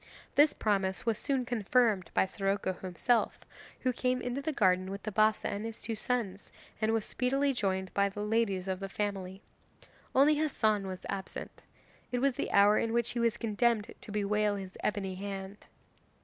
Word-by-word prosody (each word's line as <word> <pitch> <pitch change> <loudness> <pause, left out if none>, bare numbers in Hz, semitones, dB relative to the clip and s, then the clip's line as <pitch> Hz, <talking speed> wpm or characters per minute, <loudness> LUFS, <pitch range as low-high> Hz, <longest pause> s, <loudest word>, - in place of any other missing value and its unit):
This 290 +1 +6
promise 195 -2 0
was 225 -3 +1
soon 270 -3 0
confirmed 225 -4 +2
by - - +4
Siroco 195 0 -1
himself, 190 +7 0 0.4
who 255 -1 +1
came 255 +1 0
into 250 +3 -3
the 315 - -1
garden 185 -7 +2
with 200 +1 -6
the 215 - -3
Bassa 215 +1 +3
and 200 +1 -3
his 225 0 -6
two 230 - -3
sons, 215 -3 -2 0.3
and 220 0 +2
was 225 -1 0
speedily 275 +2 +1
joined 190 -5 -1
by 200 0 +2
the 205 +1 -5
ladies 210 -4 0
of 190 -1 -2
the 195 0 -5
family. 195 -1 -3 0.7
Only 290 +3 +5
Hassan 215 -10 +1
was 185 -1 -6
absent. 195 -1 -6 0.5
It 250 - 0
was 270 +2 +2
the - - -3
hour 205 +1 +5
in 230 0 -1
which 235 0 +1
he 240 - -3
was 235 0 +2
condemned 230 0 +1
to 215 - -8
bewail 210 0 +1
his 190 -1 -7
ebony 195 -2 -1
hand. 195 +1 -7
210 Hz, 175 wpm, -31 LUFS, 195-240 Hz, 0.7 s, This